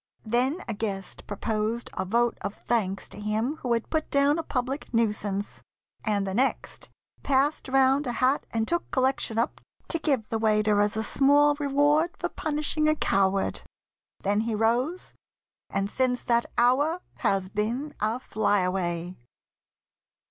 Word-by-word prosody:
Then 255 - +1
a 230 - -2
guest 200 -3 -5
Proposed 215 +2 -2
a - - -2
vote 235 +4 +2
of 200 - -4
thanks 200 -5 -1
to 210 - -10
him 220 +8 -1
who 250 - -4
had 230 -1 -2
Put 315 -1 -1
down 280 +3 +3
a - - -2
public 265 0 -3
nuisance, 210 -3 -1 0.4
and 205 -2 0
the 190 - -3
next 260 +6 -1 0.3
Passed 280 +2 +1
round 270 +1 +3
a 245 - -1
hat 255 +4 +2
and 225 -1 -1
took 345 0 -1
collection 260 -4 0
up 230 - -1 0.3
To 330 - 0
give 270 -9 0
the 225 - -1
waiter 215 -1 +3
as 205 +1 0
a 220 - 0
small 285 +4 +4
reward 290 +4 +2
For - - -2
punishing 305 0 -1
a 310 - +3
coward. 195 -7 +1 0.6
Then 205 +1 +2
he 225 0 -1
rose, 245 +11 0 0.6
And 195 0 -1
since 250 +3 0
that 235 -1 +2
hour 285 +9 +3 0.2
has 195 -1 0
been 235 +9 -2
a 220 +3 0
fly 205 -5 +1
away. 180 -1 -2
235 Hz, 155 wpm, -27 LUFS, 210-280 Hz, 0.6 s, small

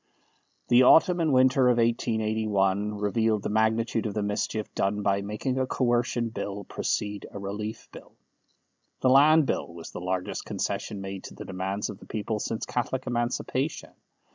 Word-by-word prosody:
The 120 +1 +6
autumn 175 +7 +6
and 160 -3 +2
winter 130 0 +4
of 125 -1 +4
1881 110 -4 +1
revealed 105 0 +1
the - - -2
magnitude 110 +1 +1
of 105 - -5
the 105 - 0
mischief 105 +1 -2
done 100 +1 -1
by 100 0 +1
making 105 +6 -2
a 130 - 0
Coercion 120 -2 0
Bill 100 -2 -5
precede 105 +1 -3
a - - -9
Relief 105 +3 -5
Bill. - - -13 0.9
The 130 - +4
Land 150 +3 +6
Bill 115 - -2
was 85 -1 -10
the - - -7
largest 90 0 -3
concession 100 -2 -3
made 95 -1 -6
to - - -10
the - - -8
demands 95 +2 -3
of 100 - -11
the - - -14
people 110 0 -3
since 110 +1 -3
Catholic 125 +2 -2
Emancipation. 125 +4 -2
110 Hz, 165 wpm, -27 LUFS, 100-125 Hz, 0.9 s, The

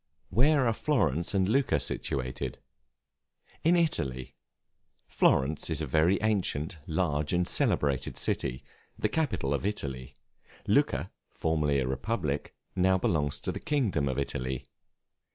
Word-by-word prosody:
Where 140 +2 +4
are 115 - +3
Florence 100 - 0
and 95 -1 +3
Lucca 125 - +2
situated? 65 -2 -3 1.1
In 170 +2 +5
Italy. 65 - -1 0.7
Florence 75 +5 +2
is 80 -2 0
a 80 - -1
very 80 +7 +3
ancient, 90 -7 0
large, 75 -2 0
and 90 0 +2
celebrated 70 -3 +1
city, 65 - -1 0.3
the 105 - 0
capital 135 - 0
of 70 - -1
Italy; 70 -11 -3 0.5
Lucca, - - +2 0.2
formerly 75 -3 0
a 65 -2 0
republic, 75 - -2 0.2
belongs 90 -6 +2
now - - -25
to - - -1
the - - -5
kingdom 105 - 0
of 65 - -2
Italy. 65 -1 -3
80 Hz, 125 wpm, -29 LUFS, 70-105 Hz, 1.1 s, In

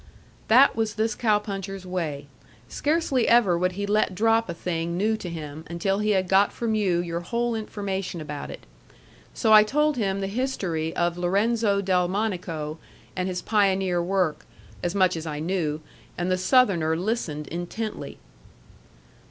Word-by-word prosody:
That 255 +5 +6
was 220 -1 -1
this 220 +1 0
cow 215 -2 +2
puncher's 195 -2 -6
way. 160 -6 -3 0.4
Scarcely 290 - 0
ever 230 -7 +5
would 180 +1 0
he 200 +2 -3
let 205 -2 +1
drop 225 +1 +2
a - - -2
thing 170 0 -3
new 215 +4 +1
to 180 - -6
him 155 -2 -7
until 195 +4 -1
he 210 0 0
had 190 -3 +2
got 195 +2 +4
from 230 -2 -2
you 190 -5 +1
your 170 -1 -3
whole 235 +7 -1
information 195 -4 -4
about 150 -2 -6
it. - - -9 0.7
So 220 - +3
I 215 - +10
told 300 +6 +1
him 195 -3 0
the 195 - -2
history 195 -8 -2
of 175 0 0
Lorenzo 200 +3 +1
Delmonico 180 -4 -1 0.4
and 185 0 -1
his 180 -1 -4
pioneer 195 -4 +2
work, 180 -3 0 0.4
as 175 +2 -2
much 185 -2 +3
as 165 0 -5
I 150 -1 -4
knew, 160 -2 -1 0.4
and 175 +1 -1
the - - +3
Southerner 185 -7 +3
listened 175 -6 -2
intently. 175 +6 -5
190 Hz, 160 wpm, -25 LUFS, 175-215 Hz, 0.7 s, I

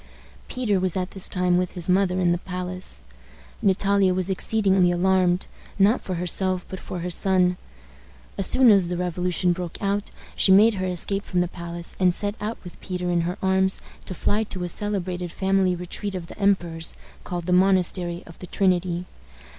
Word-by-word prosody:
Peter 220 -6 0
was 185 -1 -1
at 180 0 -2
this 195 - -3
time 180 -1 +2
with 180 -1 -2
his 175 -2 -3
mother 185 0 +2
in 175 -2 +3
the 175 - 0
palace. 180 - -4 0.6
Natalia 195 -1 +3
was 185 +1 -1
exceedingly 190 -2 +2
alarmed, 180 0 +2 0.3
not 205 +5 +4
for 185 - -4
herself, 180 +1 0
but 190 - -6
for 180 - -6
her 180 +1 -3
son. 180 0 +2 0.8
As 195 - -1
soon 255 -3 +5
as 195 -4 +4
the 175 0 -3
revolution 180 0 0
broke 175 -1 -6
out 200 +1 -1 0.3
she 190 - +4
made 215 +4 +7
her 185 -2 -2
escape 195 +3 0
from 180 -4 0
the 175 - 0
palace, 170 0 -3
and 180 -2 +3
set 205 0 -1
out 215 +2 -3
with 180 - -12
Peter 180 -1 -3
in 170 -1 +2
her 180 - -5
arms 190 0 +2 0.3
to 185 - -6
fly 210 +5 0
to 185 -3 -5
a 175 - -3
celebrated 185 -3 -3
family 190 -1 +1
retreat 185 +3 -4
of 180 -2 -5
the - - -12
emperor's, 175 -5 0 0.3
called 175 -1 -4
the 180 - +1
Monastery 180 -2 +2
of 165 - -14
the 180 - -8
Trinity. 180 -2 0
185 Hz, 185 wpm, -24 LUFS, 180-195 Hz, 0.8 s, made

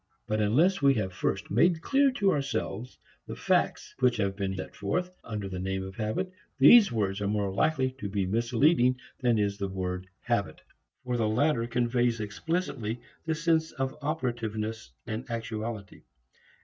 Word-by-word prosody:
But 110 -1 0
unless 155 - +3
we 140 -1 +5
have 95 -5 -2
first 100 +2 -2
made 160 - +3
clear 275 0 +4
to 200 -6 +2
ourselves 130 - -3 0.3
the - - -5
facts - - 0
which 125 -2 +3
have 100 -2 0
been 95 -1 -2
set 95 - -7
forth 180 - -2
under 105 -3 -4
the 95 -1 -5
name 95 +1 -2
of 95 0 -8
habit, 110 - -2 0.3
these 200 - +8
words 105 -3 -1
are 100 - 0
more 100 -2 0
likely 130 +4 +1
to 100 - -4
be 100 -1 0
misleading 125 - +3 0.2
than 120 -3 +2
is 100 -1 0
the 100 - -1
word 90 -1 -4
habit. - - -1 0.5
For 125 -1 -1
the 110 -2 +1
latter 120 0 +2
conveys 120 0 +1
explicitly 115 - -3 0.3
the 160 - +1
sense 160 0 +1
of 135 0 -2
operativeness, 115 - -3 0.2
actuality. 110 -2 -5
115 Hz, 160 wpm, -28 LUFS, 100-135 Hz, 0.5 s, these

